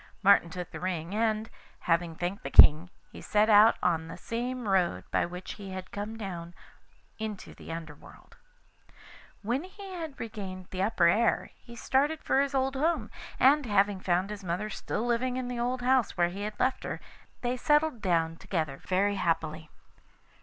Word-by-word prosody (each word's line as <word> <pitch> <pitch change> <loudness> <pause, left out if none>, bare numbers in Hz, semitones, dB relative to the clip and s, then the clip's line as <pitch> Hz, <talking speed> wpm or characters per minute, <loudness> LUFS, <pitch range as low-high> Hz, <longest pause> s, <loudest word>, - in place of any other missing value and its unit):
Martin 195 -3 +5
took 180 +1 -7
the - - -7
ring, 180 -1 -3
and, 220 0 0 0.3
having 165 -1 0
thanked 180 +4 -3
the 135 - -5
King, 155 +5 +8 0.2
he - - -10
set 215 +1 +2
out 215 +2 +7
on 165 -3 +1
the 165 - -8
same 245 0 -4
road 190 -3 +1
by - - +1
which 180 +1 -7
he 195 - -7
had 185 -1 -7
come 210 +2 -5
down 175 -5 -6 0.6
into 215 -2 -6
the - - -10
Under 165 -2 -6
world. 145 - -17 1.1
When 245 +8 -1
he 385 +1 -10
had 320 -5 -6
regained 195 -5 -6
the 185 - -3
upper 215 +4 +2
air 220 +7 +2
he 235 - -14
started 285 +6 0
for 270 - +3
his 280 0 -1
old 265 0 +1
home, 300 -5 0 0.3
and 275 +1 +5
having 205 -1 +2
found 185 +2 0
his 210 -1 -7
mother 185 +5 -3
still 225 - -3
living 245 +1 0
in 255 -1 -3
the 245 -1 -4
old 245 +1 -1
house 255 -5 +2
where 175 0 +3
he 195 +3 -7
had 210 +1 -5
left 260 +1 +1
her, - - -4 0.4
they 245 0 -1
settled 295 -1 +2
down 165 -3 +1
together 155 -8 -3
very 200 +2 +1
happily. 160 -3 -1
205 Hz, 180 wpm, -29 LUFS, 175-245 Hz, 1.1 s, King